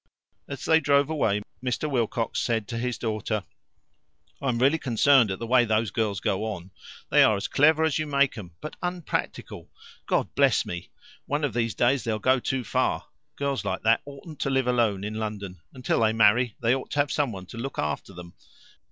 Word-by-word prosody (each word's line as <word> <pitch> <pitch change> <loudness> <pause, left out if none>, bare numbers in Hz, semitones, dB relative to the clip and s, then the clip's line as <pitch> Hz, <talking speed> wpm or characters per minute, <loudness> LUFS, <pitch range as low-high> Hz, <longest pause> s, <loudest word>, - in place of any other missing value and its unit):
As - - -6
they 160 0 +5
drove 145 0 +2
away, 105 -9 0 0.2
Mr. 125 +4 -1
Wilcox 115 -4 -1
said 110 -3 -1
to 115 -1 -3
his 125 0 -2
daughter: 110 -2 -2 1.0
"I 135 - 0
am 120 - 0
really 135 +6 +3
concerned 130 -1 +4
at 95 - -2
the 115 - -5
way 125 +1 +4
those 110 -2 0
girls 105 -3 -1
go 95 +2 -1
on. 95 -4 -6 0.4
They - - +6
are 110 - +5
as 100 - -3
clever 155 +3 +4
as 160 -1 +1
you 155 - -2
make 140 -2 +2
'em, 90 -7 -9
but 155 - -7
unpractical 180 -2 -4 0.4
God - - 0
bless - - +3
me! 90 0 -6 0.4
One 145 +1 -1
of 140 -6 0
these 115 -1 -1
days 125 +2 +2
they'll 110 -2 -1
go 130 +4 +2
too 130 +1 -2
far. 130 +2 -1 0.3
Girls 140 -1 -2
like - - -3
that 115 +1 +4
oughtn't 145 +2 -10
to - - -1
live 135 -1 +1
alone 115 -6 +1
in 105 +1 -4
London. 105 -5 -5
Until 125 - -1
they 110 -1 +3
marry, 115 +1 +4
they 115 +2 +4
ought 135 - -3
to 145 - -1
have 145 - -2
someone 115 -11 -2
to 100 - -11
look 135 +2 -5
after 75 +6 -3
them. 85 -1 -11
120 Hz, 200 wpm, -26 LUFS, 110-140 Hz, 1.0 s, They